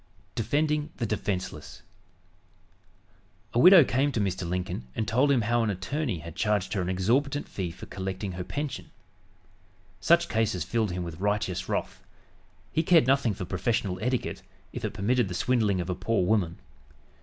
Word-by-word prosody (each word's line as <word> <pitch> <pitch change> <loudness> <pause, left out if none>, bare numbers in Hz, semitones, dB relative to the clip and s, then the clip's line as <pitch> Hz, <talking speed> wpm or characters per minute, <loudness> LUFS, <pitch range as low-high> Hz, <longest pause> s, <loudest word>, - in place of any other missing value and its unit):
DEFENDING 150 +6 0
THE 120 - -1
DEFENSELESS 95 -7 -4 1.7
A 120 - +2
widow 180 +2 +9
came 135 +3 +1
to 115 - 0
Mr. 95 -3 -1
Lincoln 90 -8 -3
and 110 - -2
told 135 +5 +3
him 130 -4 +3
how 120 +2 +1
an 115 - +1
attorney 115 - -2
had 80 0 -9
charged 105 -2 0
her 100 - 0
an 90 - -2
exorbitant 130 +11 +1
fee 95 -3 -4
for 85 - -10
collecting 95 +1 -4
her 90 0 -5
pension. 145 +8 -5 1.1
Such 170 - +4
cases 110 0 0
filled 115 -3 0
him 90 0 -3
with 85 -1 -7
righteous 100 -2 -1
wrath. - - -3 0.7
He 160 - +2
cared 165 -3 +5
nothing 130 -5 +2
for 90 - -5
"professional 95 0 -1
etiquette," 125 +2 -2 0.3
if - - -6
it - - -3
permitted 120 +3 +1
the 90 - -5
swindling 110 -4 +1
of 90 - -3
a - - +1
poor 95 +1 0
woman. 90 -4 +1
105 Hz, 165 wpm, -27 LUFS, 90-125 Hz, 1.7 s, widow